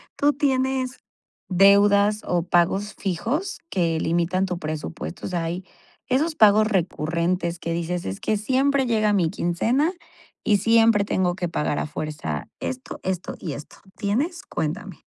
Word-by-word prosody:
¿Tú 290 0 +3
tienes 265 -2 0 0.5
deudas 200 +2 +5
o 175 -2 0
pagos 180 +4 +1
fijos 230 - -2
que 165 -4 0
limitan 170 +3 +1
tu 180 -2 -3
presupuesto? 150 - -5
O - - -3
sea, 175 -2 -1
hay 175 +3 -4 0.4
esos 305 +5 +1
pagos 215 -2 +6
recurrentes 170 -2 -1
que 170 - -3
dices: 170 +1 -2
"Es 95 +1 -4
que 215 - 0
siempre 265 +5 +2
llega 215 -3 +2
mi 180 -5 +2
quincena 230 - +1 0.5
y 210 - +4
siempre 225 0 +4
tengo 180 -3 0
que 175 -2 -3
pagar 150 -3 -1
a - - -2
fuerza 150 - -4
esto, 260 0 -5
esto 185 -1 -3
y 160 - -4
esto", 145 +2 -10 0.2
¿tienes? 275 - -1
Cuéntame. 190 +6 -4
190 Hz, 145 wpm, -24 LUFS, 170-225 Hz, 0.5 s, pagos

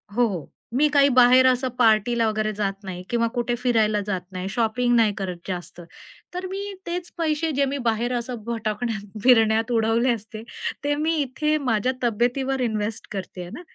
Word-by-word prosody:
हो, 245 0 +4
हो. 180 -9 -5 0.3
"मी 300 +3 +4
काही 280 0 +6
बाहेर 255 +1 +7
असं 255 0 +2
पार्टीला 230 0 +3
वगैरे 215 0 0
जात 200 -1 -1
नाही 180 -2 -6
किंवा 230 -1 +1
कुठे 240 0 0
फिरायला 225 -4 +2
जात 190 -3 -1
नाही, 185 +1 -4
शॉपिंग 240 +3 +1
नाही 225 -3 +4
करत 185 -3 -4
जास्त. 175 -1 -6 0.5
तर 360 +1 -4
मी 400 +1 -5
तेच 345 0 -4
पैसे 320 -1 0
जे 280 - +3
मी 275 +1 -2
बाहेर 235 +2 0
असं 235 -2 -5
भटकण्यात 220 -2 -3
फिरण्यात 225 -2 +4
उडवले 230 +2 +2
असते 220 -1 -8 0.4
ते 290 0 +1
मी 315 +2 0
इथे 300 +3 0
माझ्या 225 +3 +2
तब्येतीवर 245 +4 0
इन्व्हेस्ट 220 -2 -2
करते 190 -2 -6
आहे 175 - -7
ना. 250 - -7
235 Hz, 175 wpm, -24 LUFS, 215-260 Hz, 0.5 s, बाहेर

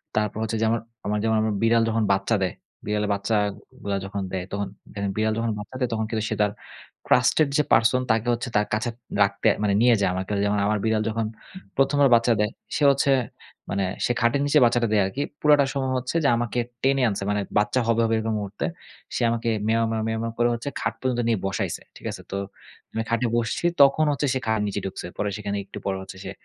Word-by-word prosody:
তারপর 105 -1 0
হচ্ছে 110 0 -2
যে - - +3
আমার, 115 0 0 0.2
আমার 105 0 0
যেমন 110 0 +2
আমার 110 -1 0
বিড়াল 115 0 +4
যখন 115 0 +1
বাচ্চা 95 +4 +2
দেয়, 90 - -1 0.3
বিড়ালের 105 0 -1
বাচ্চাগুলা 100 -1 -2
যখন 100 +1 -4
দেয়, 95 -1 -3
তখন 100 0 -2 0.3
দেখেন 100 -1 -2
বিড়াল 110 0 +1
যখন 115 0 0
বাচ্চা 105 +5 -9
দেয়, 125 -2 0
তখন 110 -1 -1
কিন্তু 110 -2 -2
সে 110 - -1
তার, 105 -1 +2 0.6
ট্রাস্টেড 135 +4 +4
যে 150 - +4
পারসন 115 +3 +4
তাকে 110 +1 +1
হচ্ছে 120 +1 -3
তার 105 - +1
কাছে 110 +3 0 0.3
রাখতে, 100 0 0 0.2
মানে 100 -1 +2
নিয়ে 120 0 +6
যায়, 100 - +3
আমার 95 +1 -3
কাছে 100 -1 0
যেমন 105 0 +1
আমার 105 0 +1
বিড়াল 110 -1 +2
যখন 110 0 -1 0.5
১ম 135 +1 +3
বার 140 - +6
বাচ্চা 115 +1 +3
দেয়, 105 0 +1 0.2
সে 150 - 0
হচ্ছে, 140 0 +2 0.6
মানে 100 0 0 0.2
সে - - +1
খাটের 120 +4 +2
নিচে 145 +1 +4
বাচ্চাটা 120 0 +2
দেয় 105 - +4
আরকি। 110 +9 -3 0.2
পুরাটা 145 -2 +5
সময় 135 -2 -1
হচ্ছে 125 +4 -4
যে, - - +4
আমাকে 120 0 -1 0.2
টেনে 135 0 +3
আনছে। 100 -1 -3
মানে 105 0 0 0.2
বাচ্চা 105 +5 +2
হবে, 115 0 +3
হবে 115 0 +1
এরকম 110 0 -1
মুহূর্তে। 100 0 -4 0.5
সে - - -1
আমাকে 115 0 -1 0.2
মেও, 115 +1 +2
মেও, 110 -1 -1
মেও, 110 0 -1
মেও 115 - -2
করে 120 0 +4
হচ্ছে 120 +4 -4
খাট - - -1
পর্যন্ত 125 -2 0
নিয়ে 115 -3 +2
বসাইছে। 95 - -2
ঠিক - - -14
আছে? - - -8
তো, 100 - -2 0.6
মানে 110 - -1
খাটে 115 +1 +1
বসছি, 120 +8 -1 0.2
তখন 140 +3 +6
হচ্ছে 145 0 0
সে, 130 - 0
খাটের 110 -2 +1
নিচে 100 0 -2
ঢুকছে। 95 - -5
পরে 105 - -1
সেখানে 100 -1 -3
একটু 100 - -10
পর 95 - 0
হচ্ছে 95 0 -10
সে - - -5
110 Hz, 220 wpm, -24 LUFS, 105-120 Hz, 0.6 s, নিয়ে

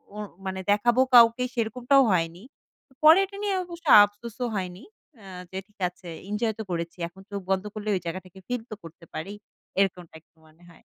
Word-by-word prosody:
ও - - -8 0.3
মানে 190 0 -3
দেখাবো 240 +5 +3
কাউকে, 235 +1 +7
সেরকমটাও 245 +4 +2
হয়নি। 170 +2 -1 0.6
পরে 320 +5 +8
এটা 400 +1 -12
নিয়ে 400 -2 0
অবশ্য 340 -1 -11 0.2
আফসোসও 230 +4 -4
হয়নি। 185 0 -5 0.4
আ - - -14 0.3
যে, 190 - -6
"ঠিক 210 - -34
আছে, 180 0 -16 0.2
এনজয় 220 +1 -1
তো - - -3
করেছি 170 +1 -4
এখন 190 +3 -16
চোখ 200 - -3
বন্ধ 190 +1 +1
করলে, 215 0 -5
ওই - - -1
জায়গাটাকে 185 +2 -7
ফিল 245 -2 -2
তো - - -4
করতে 165 +1 -13
পারি।" 195 +6 -5 0.5
এরকমটা 180 -4 -1
একটু 165 - -64
মনে 160 +3 -23
হয়। 165 - -19
205 Hz, 180 wpm, -26 LUFS, 180-240 Hz, 0.6 s, পরে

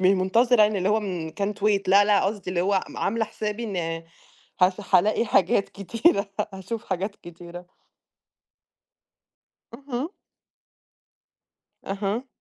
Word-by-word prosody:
منتظرة 225 +5 +3
يعني، 210 -1 +2
اللي 185 +1 0
هو 215 +1 +2
من 180 -6 -4
can't 200 +4 -3
wait. 205 -2 +3
لا، 200 +2 +6
لأ، 205 -1 +3
قصدي 200 -1 -2
اللي 180 -1 0
هو 195 +1 +2
م - - -12
عامِلة 225 +2 0
حسابي 215 +1 -4
إن 205 -4 -4 0.9
ه 180 +1 +6 0.2
هالاقي 215 +5 +4
حاجات 195 -1 +2
كتيرة، 200 - +1 0.3
هاشوف 190 +4 -6
حاجات 195 +3 -3
كتيرة. 175 +1 -11 2.1
اهم. 275 +1 -4 1.8
أها. 200 +6 -3
200 Hz, 120 wpm, -25 LUFS, 190-220 Hz, 2.1 s, لا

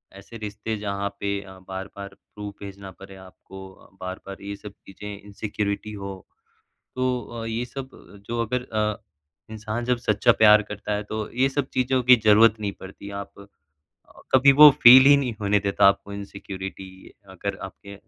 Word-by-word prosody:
ऐसे 100 +4 -12
रिश्ते 110 +1 -5
जहाँ 100 -1 -3
पे 100 0 -1
अ, 95 -1 -13
बार-बार 95 +1 -7 0.3
प्रूफ़ 105 -1 -7
भेजना 100 -1 -9
पड़ें 95 +1 -14
आपको, 95 +1 -13 0.3
बार-बार 95 +1 -8
ये 100 0 -5
सब 105 +1 -11 0.2
चीज़ें 105 +1 -9
इनसिक्योरिटी 105 +1 -4
हो, 100 -2 -8 0.7
तो 130 -1 -1 0.2
अ, - - -5
ये 115 +2 -3
सब 135 +1 -8 0.4
जो 115 0 -2
अगर 125 +3 -2
अ, 105 0 -1 0.5
इंसान 110 +2 -5
जब 125 0 +1
सच्चा 110 0 +2
प्यार 105 -1 +7
करता 105 0 -5
है, 105 - -2
तो 110 0 -5
ये 130 +2 +3
सब 135 -1 -2
चीज़ों 130 0 +1
की 125 +1 +8
ज़रूरत 110 +1 +6
नहीं 105 -2 -3
पड़ती 95 +1 -10
आप 100 - -10
अ, 100 - -12 0.9
कभी 135 +2 +7
वो 150 +2 +10
फ़ील 130 +2 +10
ही 145 - +8
नहीं 125 -4 -2
होने 100 0 +2
देता 100 -1 +2
आपको 100 +1 -1
इनसिक्योरिटी 95 -1 -8 0.4
अगर 100 +1 -4
आपके 100 +1 -10
105 Hz, 165 wpm, -24 LUFS, 100-115 Hz, 0.9 s, वो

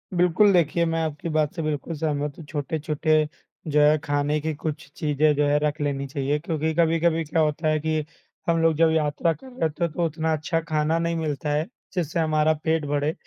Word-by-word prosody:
बिल्कुल, 180 +4 +4
देखिए, 170 -1 +2
मैं 165 0 0
आपकी 155 +1 -4
बात 155 -2 +1
से 170 - -3
बिल्कुल 155 +1 -3
सहमत 145 -1 -1
हूँ। 165 - -10
छोटे-छोटे, 155 +1 0 0.4
जो 150 -1 +2
है, 150 +1 +5
खाने 145 0 0
की 160 +1 -2
कुछ 150 -1 -5
चीज़ें, 150 0 +2
जो 145 +1 +2
है, 145 +1 +3
रख 150 +1 0
लेनी 140 -1 -1
चाहिए, 140 +2 -1
क्योंकि 160 0 -2
कभी-कभी 165 0 +2
क्या 160 +1 0
होता 155 +1 0
है 155 0 +2
कि 155 0 -1 0.4
हम 165 -1 +2
लोग 165 -1 +3
जब 165 0 +4
यात्रा 160 +1 +1
कर 265 - -14
रहे 255 -1 -13
होते 160 +1 -1
हैं, 170 - 0
तो 175 - 0
उतना 160 0 -1
अच्छा 155 +2 -1
खाना 155 +1 +1
नहीं 170 0 -1
मिलता 150 -3 -2
है, 150 +2 +1 0.3
जिससे 170 -2 -1
हमारा 155 -1 +2
पेट 160 -2 +1
भरे। 145 +2 0
155 Hz, 210 wpm, -24 LUFS, 150-165 Hz, 0.4 s, है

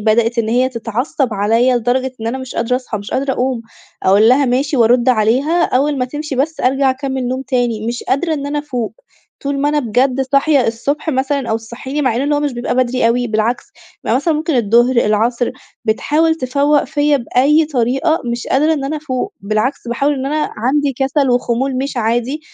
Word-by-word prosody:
بدأت 230 +2 +2
إن 220 -1 +1
هي 250 +3 +2
تتعصب 240 +1 -2
عليَّ 230 +5 +2
لدرجة 250 +2 0
إن 225 - -4
أنا 245 +3 -2
مش 260 -1 -8
قادرة 235 +2 0
أصحى، 250 -4 -5
مش 200 - -9
قادرة 270 0 0
أقوم، 255 -2 -1 0.4
أقول 205 +4 +5
لها: 270 +3 +4
"ماشي." 270 +3 0
وأرد 240 +1 +3
عليها، 255 +9 +2
أوّل 280 +2 +1
ما 250 - +1
تمشي 295 +2 -5
بس 310 +4 -1
أرجع 270 +1 +2
أكمّل 265 -1 -3
نوم 260 +1 -2
تاني، 240 -5 -1
مش 240 +1 -3
قادرة 315 +4 0
إن 285 -1 -4
أنا 295 +1 -2
أفوق، 255 -6 -4 0.5
طول 280 0 -2
ما 290 - +2
أنا 300 0 +1
بجد 255 +3 +1
صاحية 275 0 +2
الصبح 280 +8 -2
مثلًا 265 -2 -1
أو 220 - +2
تصحيني، 250 +6 -5
مع 255 -4 +1
إن 280 +4 0
هو 290 - +1
مش 290 -3 -1
بيبقى 240 0 -3
بدري 255 -1 +1
أوي، 245 +1 +1
بالعكس 220 +2 -1 0.4
بيبقى 230 - +2
مثلًا 310 +4 +1
ممكن 310 +1 -1
الظهر، 240 +3 +3
العصر، 235 +2 +1 0.3
بتحاول 305 +8 +1
تفوق 285 +1 +1
فيَّ 290 +1 +1
بأي 280 +5 +2
طريقة، 270 +4 0
مش 235 0 -3
قادرة 305 +4 +2
إن 285 -3 -2
أنا 305 +3 -2
أفوق، 265 -4 -3
بالعكس 215 +5 -2
باحاول 280 +5 +1
إن 265 0 -3
أنا 300 +2 -1
عندي 275 +5 +1
كسل 270 0 +1
وخمول 245 +2 0
مش 275 0 -3
عادي. 240 +6 -1
255 Hz, 195 wpm, -16 LUFS, 235-285 Hz, 0.5 s, أقول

